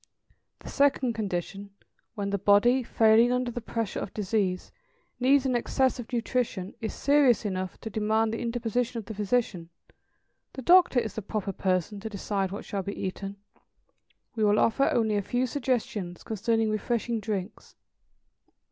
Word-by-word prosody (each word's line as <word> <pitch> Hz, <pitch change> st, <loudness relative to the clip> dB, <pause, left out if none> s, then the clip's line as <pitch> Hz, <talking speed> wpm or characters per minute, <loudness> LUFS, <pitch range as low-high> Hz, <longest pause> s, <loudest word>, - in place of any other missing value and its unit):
The -, -, -9 dB
second 275 Hz, -4 st, +2 dB
condition, 200 Hz, -1 st, -4 dB, 0.4 s
when 200 Hz, -2 st, -3 dB
the 200 Hz, -, 0 dB
body, 205 Hz, +6 st, +4 dB
failing 230 Hz, 0 st, +4 dB
under 250 Hz, -1 st, 0 dB
the 240 Hz, -, -5 dB
pressure 225 Hz, -2 st, -3 dB
of -, -, -6 dB
disease, 195 Hz, -3 st, -1 dB, 0.5 s
needs 270 Hz, +2 st, +4 dB
an 255 Hz, -2 st, +1 dB
excess 260 Hz, +2 st, +1 dB
of 245 Hz, -, -8 dB
nutrition, 230 Hz, -5 st, -2 dB
is 220 Hz, -, -2 dB
serious 280 Hz, -6 st, +3 dB
enough 185 Hz, -2 st, -3 dB
to 220 Hz, -, -5 dB
demand 220 Hz, +1 st, +1 dB
the 230 Hz, -, -3 dB
interposition 240 Hz, +1 st, -1 dB
of 225 Hz, -, -5 dB
the 220 Hz, -, -6 dB
physician 205 Hz, -5 st, -1 dB, 0.8 s
the 265 Hz, -, -7 dB
doctor 350 Hz, -4 st, +6 dB
is 220 Hz, -3 st, -3 dB
the 220 Hz, -, -4 dB
proper 205 Hz, 0 st, -3 dB
person 185 Hz, +2 st, -1 dB
to 220 Hz, +2 st, -6 dB
decide 200 Hz, -1 st, -2 dB
what 200 Hz, +3 st, -7 dB
shall 200 Hz, -, -3 dB
be 200 Hz, +2 st, -6 dB
eaten; 195 Hz, +1 st, -4 dB, 1.0 s
we 220 Hz, -, 0 dB
will 210 Hz, 0 st, +4 dB
offer 230 Hz, +6 st, +3 dB
only 220 Hz, -3 st, +1 dB
a -, -, +1 dB
few 245 Hz, +6 st, -1 dB
suggestions 225 Hz, -8 st, -2 dB
concerning 225 Hz, +1 st, 0 dB
refreshing 230 Hz, +2 st, -1 dB
drinks. 205 Hz, -2 st, -5 dB
220 Hz, 155 wpm, -27 LUFS, 200-240 Hz, 1.0 s, doctor